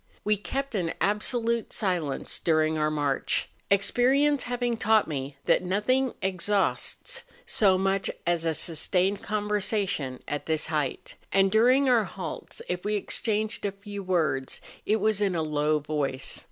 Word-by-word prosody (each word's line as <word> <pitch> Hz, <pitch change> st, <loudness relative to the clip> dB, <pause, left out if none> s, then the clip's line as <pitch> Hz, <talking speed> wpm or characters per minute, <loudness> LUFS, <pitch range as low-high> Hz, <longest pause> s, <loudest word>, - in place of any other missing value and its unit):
We 210 Hz, 0 st, +3 dB
kept 270 Hz, +7 st, -4 dB
an 175 Hz, -6 st, -1 dB
absolute 230 Hz, +3 st, 0 dB
silence 175 Hz, -9 st, -1 dB
during 155 Hz, -1 st, +2 dB
our 155 Hz, 0 st, +1 dB
march, 145 Hz, -3 st, 0 dB, 0.2 s
experience 255 Hz, +8 st, +3 dB
having 245 Hz, -1 st, -1 dB
taught 220 Hz, -1 st, +3 dB
me 140 Hz, -2 st, -4 dB
that -, -, +4 dB
nothing 220 Hz, +8 st, +1 dB
exhausts 190 Hz, +1 st, 0 dB, 0.2 s
so 195 Hz, -3 st, +3 dB
much 195 Hz, 0 st, +1 dB, 0.2 s
as 170 Hz, -1 st, +1 dB
a 165 Hz, -1 st, 0 dB
sustained 180 Hz, +5 st, +1 dB
conversation 205 Hz, -, -1 dB
at 145 Hz, -, -4 dB
this 160 Hz, -1 st, 0 dB
height; 150 Hz, -4 st, -2 dB, 0.2 s
and 195 Hz, 0 st, +4 dB
during 255 Hz, +5 st, +4 dB
our 240 Hz, -4 st, +4 dB
halts, 180 Hz, -3 st, -7 dB
if 180 Hz, 0 st, -3 dB
we 210 Hz, +1 st, 0 dB
exchanged 215 Hz, +1 st, -1 dB
a 200 Hz, -, 0 dB
few 200 Hz, +1 st, -8 dB
words, 160 Hz, -8 st, 0 dB, 0.3 s
it 215 Hz, -, +4 dB
was 215 Hz, -1 st, +1 dB
in 195 Hz, -3 st, +1 dB
a 160 Hz, -, 0 dB
low 150 Hz, 0 st, +1 dB
voice. 145 Hz, -3 st, -3 dB
195 Hz, 145 wpm, -27 LUFS, 160-215 Hz, 0.3 s, that